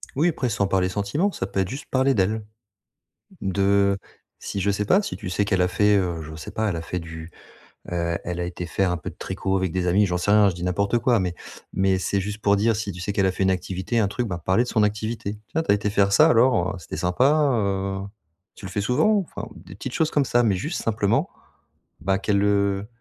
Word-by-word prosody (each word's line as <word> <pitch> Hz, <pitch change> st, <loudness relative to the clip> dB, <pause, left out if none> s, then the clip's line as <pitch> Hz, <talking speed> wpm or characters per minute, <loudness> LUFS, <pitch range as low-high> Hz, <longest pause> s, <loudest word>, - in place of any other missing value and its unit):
Oui, 155 Hz, +6 st, +3 dB
après, 130 Hz, -6 st, -1 dB
sans 100 Hz, -3 st, 0 dB
parler 95 Hz, -1 st, +1 dB
sentiments, 105 Hz, -, 0 dB
ça 95 Hz, -, -4 dB
peut 95 Hz, -, -3 dB
être 95 Hz, -, -2 dB
juste 140 Hz, +4 st, -7 dB
parler 135 Hz, +1 st, +2 dB
d'elle. 105 Hz, +1 st, 0 dB, 1.0 s
De 100 Hz, +1 st, +2 dB, 0.4 s
si, 100 Hz, -, -4 dB
je 100 Hz, +1 st, +1 dB
sais 100 Hz, +1 st, 0 dB
pas, 190 Hz, -, +4 dB
si 200 Hz, -, -5 dB
tu -, -, -6 dB
sais 100 Hz, +3 st, 0 dB
qu'elle 95 Hz, -3 st, +1 dB
a 90 Hz, -, +3 dB
fait, 105 Hz, +3 st, +3 dB
heu, 90 Hz, -4 st, 0 dB
je 80 Hz, 0 st, -8 dB
sais 80 Hz, -, -8 dB
pas, 110 Hz, 0 st, -1 dB
elle 95 Hz, -, -2 dB
a 80 Hz, -, -3 dB
fait 90 Hz, +2 st, -4 dB
du, 80 Hz, 0 st, -9 dB, 0.6 s
heu, 85 Hz, -1 st, -1 dB
elle 90 Hz, 0 st, -3 dB
a -, -, -1 dB
été 90 Hz, 0 st, -5 dB
faire 90 Hz, +3 st, 0 dB
un 90 Hz, -, 0 dB
peu 85 Hz, -, -7 dB
de -, -, -15 dB
tricot 95 Hz, 0 st, -2 dB
avec 95 Hz, -3 st, -1 dB
des 90 Hz, 0 st, -1 dB
amis, 100 Hz, +4 st, +4 dB
j'en 90 Hz, -1 st, -1 dB
sais 90 Hz, -, -1 dB
rien, 105 Hz, -1 st, +6 dB
je -, -, -6 dB
dis 85 Hz, -, -8 dB
n'importe 100 Hz, +5 st, +1 dB
quoi, 120 Hz, -1 st, +2 dB
mais 90 Hz, -2 st, -2 dB, 0.4 s
mais 95 Hz, 0 st, +2 dB
c'est 100 Hz, +1 st, 0 dB
juste 105 Hz, +2 st, -5 dB
pour 100 Hz, 0 st, +4 dB
dire, 110 Hz, +3 st, +2 dB
si 105 Hz, -1 st, -3 dB
tu 90 Hz, -, -9 dB
sais 100 Hz, +3 st, -2 dB
qu'elle 100 Hz, -1 st, +2 dB
a 95 Hz, -, +1 dB
fait 95 Hz, -, -3 dB
une 95 Hz, -, +3 dB
activité, 95 Hz, +5 st, -2 dB
un 100 Hz, -, +2 dB
truc, 120 Hz, +4 st, -2 dB
bah, 90 Hz, -5 st, -5 dB
parler 95 Hz, +6 st, +3 dB
de -, -, -9 dB
son 110 Hz, -, +2 dB
activité: 105 Hz, 0 st, -2 dB
«Tiens, 160 Hz, -, -1 dB
tu -, -, -1 dB
as -, -, +6 dB
été 105 Hz, 0 st, -1 dB
faire 100 Hz, -1 st, +2 dB
ça, -, -, +6 dB
alors, 115 Hz, -7 st, +3 dB
heu, -, -, -7 dB
c'était 85 Hz, -, -7 dB
sympa, 135 Hz, +12 st, +3 dB
heu, 100 Hz, -3 st, -1 dB, 0.6 s
tu 100 Hz, -, -9 dB
le -, -, -7 dB
fais 100 Hz, -, -2 dB
souvent?» 125 Hz, -, +3 dB
enfin, -, -, -8 dB
des 95 Hz, -, -12 dB
petites 125 Hz, +5 st, -6 dB
choses 160 Hz, -1 st, +1 dB
comme 145 Hz, -, +2 dB
ça, 120 Hz, 0 st, +3 dB
mais 105 Hz, -5 st, +2 dB
juste 150 Hz, -, -3 dB
simplement, 105 Hz, -3 st, +1 dB, 0.7 s
bah, 95 Hz, 0 st, +1 dB
qu'elle, 100 Hz, 0 st, +1 dB
heu 100 Hz, -1 st, +1 dB
100 Hz, 255 wpm, -24 LUFS, 95-110 Hz, 1.0 s, rien